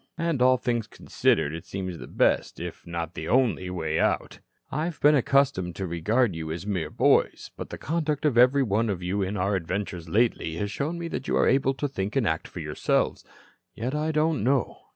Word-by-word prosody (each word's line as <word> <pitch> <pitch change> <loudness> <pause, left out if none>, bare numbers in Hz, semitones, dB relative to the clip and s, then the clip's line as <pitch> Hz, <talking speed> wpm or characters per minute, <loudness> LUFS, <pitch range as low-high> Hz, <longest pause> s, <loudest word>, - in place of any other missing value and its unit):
And, 165 -6 -1
all 130 0 +5
things 120 -3 -1
considered, 75 - 0
it 80 0 -6
seems 95 -3 -5
the - - -8
best - - +1
if - - -7
not 85 -1 -4
the - - -6
only 120 -8 +2
way 80 -3 -2
out. - - 0 0.3
"I 150 +4 -1
have 170 -2 -5
been 150 +1 +6
accustomed 130 - +2
to 95 - -3
regard 95 +5 +1
you 80 -1 -5
as 85 +3 -5
mere 90 -7 -2
boys, - - +2
but - - -7
the - - -6
conduct 155 -1 -2
of 145 -5 +2
every 130 +3 +5
one 110 0 +1
of 90 -3 -3
you 95 +3 -1
in 95 +2 -2
our 100 +2 +1
adventures 90 -1 -4
lately 100 -5 +1
shows 140 +11 -3
me 170 0 -4 0.2
you - - 0
are - - +3
able 135 0 +2
to 145 +3 -2
think 105 -5 -4
and 135 -5 +2
act 80 0 -1
for - - -8
yourselves. - - 0 0.5
Yet 125 +5 -3
I 155 +1 0
don't 155 -5 +1
know. 130 +1 +1
110 Hz, 205 wpm, -26 LUFS, 90-140 Hz, 0.5 s, been